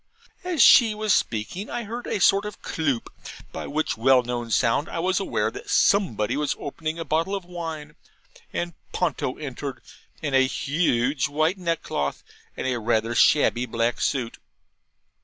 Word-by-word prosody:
As 355 -7 +3
she 225 -4 +7
was 215 -1 +1
speaking 115 - -1
I 240 - -3
heard 235 +3 -6
a - - -1
sort 195 +2 +4
of 210 - -10
CLOOP, 140 -7 -2 0.4
by - - -6
which 155 -3 -1
well 130 +2 +4
known 120 -1 -4
sound 115 +6 +1
I - - -5
was 185 +3 +1
aware 195 - -1
that 410 +4 -10
somebody 130 - +2
was 150 0 -1
opening 155 +3 -5
a 165 - -4
bottle 165 +6 0
of 195 -3 -5
wine, 160 -4 -6 0.6
and 175 0 -3 0.2
Ponto 130 - -1
entered, 140 -2 -6 0.4
in 145 -3 -2
a 130 0 +5
huge 135 -2 0
white 155 +6 0
neckcloth, 165 - -2 0.3
and - - -3
a 125 -2 0
rather 115 0 0
shabby 125 -1 +3
black 115 +1 -1
suit. 125 -4 -1
150 Hz, 160 wpm, -24 LUFS, 125-180 Hz, 0.6 s, she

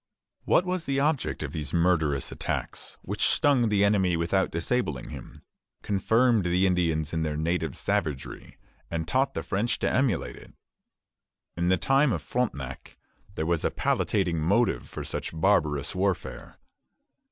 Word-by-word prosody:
What 180 - +3
was 180 -2 -2
the 135 0 0
object 145 - 0
of 70 - -5
these 75 -3 -5
murderous 80 -5 +1
attacks, - - -5
which - - 0
stung 130 -6 +3
the 100 -1 +3
enemy 95 -4 +2
without 85 +3 +1
disabling 85 - -2
him, - - -10 0.4
confirmed 110 +2 +2
the 90 +2 +2
Indians 85 -4 +1
in 80 - 0
their 75 -1 -2
native 80 -2 -1
savagery, 85 -10 -3 0.3
and 80 -1 -3
taught 130 +8 +1
the 80 - -2
French 100 +9 0
to - - -1
emulate 130 - 0
it? - - -15 1.0
In 85 +1 0
the 95 - +4
time 135 +1 +3
of - - -3
Frontenac 70 - -4 0.4
there 80 - -2
was 85 -1 0
a - - +2
palliating 90 -5 0
motive 85 - +1
for - - -6
such 80 - -5
barbarous 80 -7 +2
warfare. 95 0 -3
90 Hz, 150 wpm, -27 LUFS, 80-115 Hz, 1.0 s, the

